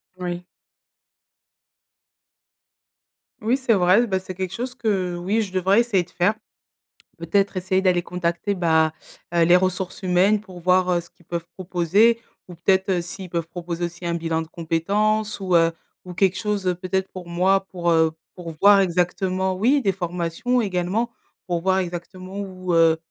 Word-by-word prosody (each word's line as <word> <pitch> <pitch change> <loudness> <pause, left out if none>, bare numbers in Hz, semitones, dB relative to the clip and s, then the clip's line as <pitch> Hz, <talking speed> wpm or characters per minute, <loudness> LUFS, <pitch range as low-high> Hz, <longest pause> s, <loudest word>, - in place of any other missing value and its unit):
Oui. 180 -1 -5 3.0
Oui, 225 +4 +2
c'est 260 -4 +1
vrai, 190 +5 +4
bah, 190 -3 0
c'est 185 0 -8
quelque 185 0 -4
chose 245 +4 -4
que- 190 -5 -1
oui- 190 +6 0
je 190 -3 -8
devrais 190 +3 +3
essayer 235 -6 +2
de 175 - -21
faire. 180 +4 +1 0.9
Peut-être 195 +4 0
essayer 185 +1 +1
d'aller 180 -2 +2
contacter, 180 +3 -2
bah, 160 -3 +3 0.4
heu, 170 - +5
les 175 +2 +6
ressources 185 0 -1
humaines, 190 +3 +3
pour 185 -4 -12
voir, 185 +1 +3
heu, 175 - +2
ce 170 - -18
qu'ils 175 - -26
peuvent 170 -1 -4
proposer 190 +6 +2 0.3
ou 180 - -10
peut-être 190 +1 +1
s'ils 180 +2 -8
peuvent 170 -1 -2
proposer 175 0 -4
aussi 175 +1 -8
un 170 - 0
bilan 165 -1 -1
de 160 - -7
compétences 200 +7 0
ou 185 -2 0
heu, 165 0 +5 0.3
ou 180 - -8
quelque 190 0 +2
chose 195 -3 -1
peut-être 190 0 -1
pour 185 -2 -9
moi 190 +3 +2
pour, 175 -2 -1
heu, 160 -1 +4 0.2
pour 175 -2 -7
voir, 200 0 +7
exactement 185 +1 0
oui, 255 +9 +3
des 200 -6 +2
formations 180 +6 -1
également, 195 +4 -1 0.3
pour 175 -2 -2
voir 190 +1 +2
exactement 185 +1 -5
où, 185 -3 -4
heu 165 -1 +5
185 Hz, 165 wpm, -23 LUFS, 175-195 Hz, 3.0 s, voir